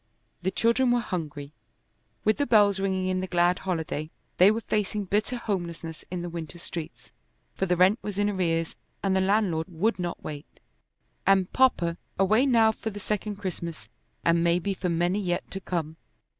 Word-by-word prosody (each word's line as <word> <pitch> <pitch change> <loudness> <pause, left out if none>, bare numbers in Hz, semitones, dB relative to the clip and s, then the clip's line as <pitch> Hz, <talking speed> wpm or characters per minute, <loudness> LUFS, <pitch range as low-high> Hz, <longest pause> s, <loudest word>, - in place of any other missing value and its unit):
The 185 - 0
children 235 +5 +2
were 240 0 +3
hungry. 150 -9 -5 0.7
With 215 - +3
the 285 - 0
bells 205 -4 +5
ringing 190 -1 0
in 185 0 0
the 185 - -3
glad 175 0 +2
holiday, 160 -4 -3 0.3
they 185 +2 +8
were 220 +2 0
facing 210 -1 -1
bitter 210 +6 0
homelessness 170 -7 -4
in 175 -1 -4
the - - -3
winter 170 -1 -6
streets, 170 -2 -7 0.4
for 190 - -1
the 180 0 +2
rent 190 +6 +5
was 205 -2 -5
in 205 0 +2
arrears 165 -5 0 0.3
and 195 -1 +2
the 190 - +3
landlord 190 -5 +1
would 185 +6 0
not 175 -1 -4
wait. 150 -1 -8 0.7
And 190 -2 +3
"Papa" 175 -10 +3 0.2
away 215 +8 +4
now 225 -4 +5
for 220 - -5
the 205 -1 -7
second 210 +1 -2
Christmas, 175 -4 -6 0.4
and 170 0 +4
maybe 175 +3 +2
for 180 -1 -2
many 175 +4 +1
yet 175 -3 -2
to 195 - -4
come! 160 -4 -3
185 Hz, 175 wpm, -27 LUFS, 170-210 Hz, 0.7 s, they